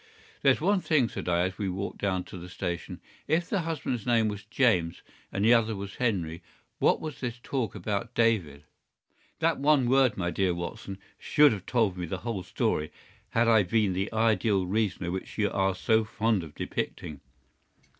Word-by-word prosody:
"There's - - +4
one 200 -2 +2
thing," 145 -10 +2
said - - -5
I, 85 0 +2
as 95 +3 -2
we 100 -2 -1
walked 95 +2 -4
down 95 -2 0
to - - -10
the 90 +1 -9
station. 90 -1 -5 0.3
"If 170 +2 +1
the 200 - 0
husband's 155 - -3
name 115 -3 +3
was 105 0 -6
James, 105 -9 +1 0.3
and 100 +2 0
the 115 - +7
other 115 -2 +2
was 100 0 -7
Henry, 90 -9 -1 0.4
what - - +3
was 155 -3 -6
this 120 -2 -4
talk 130 -6 -2
about 105 +4 -3
David?" 95 -12 +1 0.8
"That 165 -2 +2
one 140 -3 +3
word, 130 -2 +3
my 90 -2 -1
dear 90 +1 +1
Watson, 90 +2 -6 0.2
should 150 -1 +5
have 100 -3 -5
told 110 -7 +1
me 90 - -3
the - - -3
whole 115 -5 -2
story 75 -3 -1 0.4
had 115 +1 +2
I 110 -2 +6
been 105 0 +1
the 95 +3 -2
ideal 110 -3 +2
reasoner 95 -3 -1
which 95 +1 -6
you 105 -2 +1
are 95 -1 +1
so 110 +4 +2
fond 110 -3 0
of 75 -2 -11
depicting. 75 -3 -4
105 Hz, 185 wpm, -28 LUFS, 90-120 Hz, 0.8 s, the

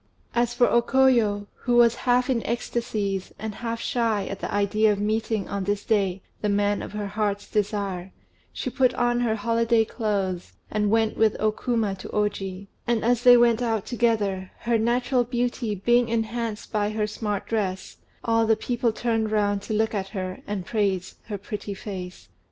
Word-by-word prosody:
As 240 0 +2
for 245 0 +4
O 235 - +4
Koyo, 235 -5 +3
who 245 - 0
was 235 -1 +6 0.2
half 245 +1 +4
in 250 -4 +1
ecstasies, 215 -5 -2
and 220 0 -5
half 230 +1 -4
shy 225 -5 0
at 195 - -5
the - - -4
idea 210 +2 +3
of 200 - -1
meeting 215 0 -1
on 200 -1 -3
this 205 +1 -1
day 195 -3 +1 0.2
the 210 - 0
man 205 0 +1
of - - -7
her 210 -1 -3
heart's 205 0 -2
desire, 200 -3 -2 0.4
she 255 - -4
put 255 0 +2
on 240 0 +1
her 235 -3 +1
holiday 230 +1 +2
clothes, 195 -6 -2 0.2
and 210 -1 +1
went 225 0 +2
with 220 -1 +3
O 215 0 +2
Kuma 225 -3 -1
to 185 - -9
Oji; 200 -2 -2 0.2
and 235 -2 +1
as 240 0 +3
they 245 0 +8
went 235 -1 +4
out 225 -4 0
together, 210 -6 0
her 235 -1 +1
natural 245 +2 +2
beauty 240 -2 -1
being 240 +4 +2
enhanced 230 -1 -2
by 210 -1 +1
her 215 0 -1
smart 210 -1 -3
dress, 190 -4 -2 0.3
all 225 -1 +2
the 220 - +5
people 240 +1 0
turned 225 -1 0
round 205 -2 +1
to 215 - -4
look 220 +1 +1
at 195 -2 -2
her, 185 -2 -5
and 200 -3 -3
praise 195 -4 -1
her 210 -2 -3
pretty 205 0 -6
face. 185 -3 -7
215 Hz, 180 wpm, -25 LUFS, 205-235 Hz, 0.4 s, they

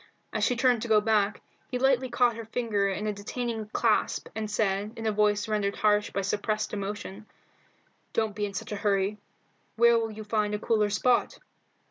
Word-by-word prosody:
As - - -1
she 250 - +2
turned 245 -1 +3
to 235 - -3
go 215 -1 +5
back, 210 -1 +1 0.3
he 250 - -2
lightly 260 0 +2
caught 240 -1 +2
her 230 0 -7
fingers 210 -4 -1
in 210 - -4
a 210 - 0
detaining 220 +2 -4
clasp, 220 0 0
and 220 -1 -4
said, 205 0 0
in 225 - -5
a 220 - +2
voice 210 0 +2
rendered 205 -2 0
harsh 210 -1 +2
by 200 - -2
suppressed 210 +2 -1
emotion 205 0 -5 0.8
"Don't 220 -2 -1
be 205 -1 -1
in 200 - -9
such - - -5
a 210 - -2
hurry. 200 0 0 0.6
Where 235 0 +5
will 225 -1 -2
you 215 0 -8
find 210 -1 0
a - - -1
cooler 210 -1 +1
spot?" 240 +4 +1
215 Hz, 190 wpm, -28 LUFS, 205-230 Hz, 0.8 s, go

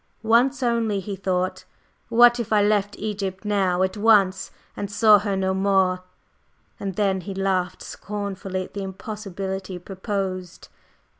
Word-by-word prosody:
Once 250 +5 +3
only, 230 -4 +1
he 195 +1 -5
thought, 185 -1 -2 0.5
"What 240 +1 +6
if 235 - -4
I 210 -1 +4
left 205 -1 +1
Egypt 200 -2 -4
now 190 -3 +1
at 190 +2 -1
once 205 -3 +3 0.3
and 200 - -4
saw 210 0 +6
her 200 -1 -2
no 190 0 0
more?" 190 -1 +2 0.8
And 195 -2 -4
then 195 -2 +1
he 195 +2 -7
laughed 190 -2 -1
scornfully 200 -2 -5
at - - -13
the 200 - -4
impossibility 190 -1 -5
proposed. 185 -1 -5
195 Hz, 140 wpm, -23 LUFS, 190-210 Hz, 0.8 s, What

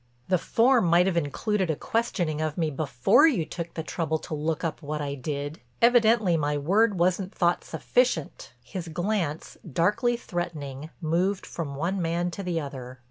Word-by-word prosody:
"The 185 -2 +3
form 240 +2 +3
might 170 +2 +5
have 190 -2 0
included 180 +5 0
a 160 - +1
questioning 175 -7 -1
of 155 -1 -2
me 160 -3 0
before 135 - +4
you 210 - +1
took 170 0 -6
the 160 - -3
trouble 160 -1 -1
to 155 - -8
look 155 +2 -2
up 165 -1 -3
what 150 0 -4
I 145 -1 -3
did. 145 +2 -4 0.2
Evidently 230 -6 +4
my 145 -1 0
word 200 +8 +2
wasn't 180 +2 0
thought 175 -1 +2
sufficient." 245 - -1
His 175 +5 -6
glance, 175 -2 -2
darkly 205 - +1
threatening, 155 - -5
moved 180 +5 0
from 145 -5 -5
one 180 +6 -1
man 170 +1 -1
to 200 - -6
the 180 -3 -1
other. 130 -4 -7
170 Hz, 170 wpm, -26 LUFS, 150-190 Hz, 0.2 s, might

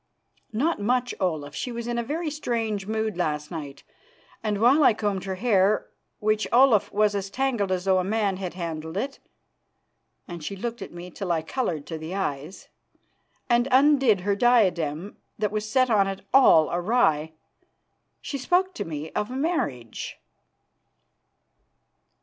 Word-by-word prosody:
"Not 275 +8 0
much, 245 +3 +1
Olaf. 155 -6 -2
She 245 - -4
was 235 0 -5
in 240 0 -2
a - - -1
very 310 +5 -3
strange 225 -8 -2
mood 220 -3 -2
last 150 -3 -2
night, 145 -4 -7 0.6
and 210 -2 -1
while 265 +7 +5
I 225 - +5
combed 200 -3 -2
her 190 -1 -3
hair, 200 -1 +2 0.3
which, 215 0 0
Olaf, 245 -4 +5
was 210 0 +2
as 195 -1 -3
tangled 235 -4 -1
as 185 0 -1
though 190 -1 +3
a - - 0
man 200 -1 0
had 185 -2 -5
handled 160 -1 -5
it," 275 +6 -3 1.1
and 170 -3 -8
she 200 - -4
looked 235 +4 -5
at - - -7
me 175 +1 -9
till 185 0 -4
I 160 -2 0
coloured 160 - -2
to 160 -2 -6
the 160 +4 -6
eyes, 155 -2 -4 0.8
"and 240 0 +3
undid 265 -6 +4
her 200 +2 0
diadem, 195 -7 +2 0.2
that 210 -2 -1
was 215 0 -3
set 255 +2 +2
on 200 -3 +4
it 195 0 -4
all 165 - +6
awry, 175 -5 +1 0.9
she 280 - -5
spoke 365 +7 +1
to - - -4
me 155 -1 -6
of 210 - -2
marriage." 255 - -3
205 Hz, 155 wpm, -25 LUFS, 175-240 Hz, 1.1 s, all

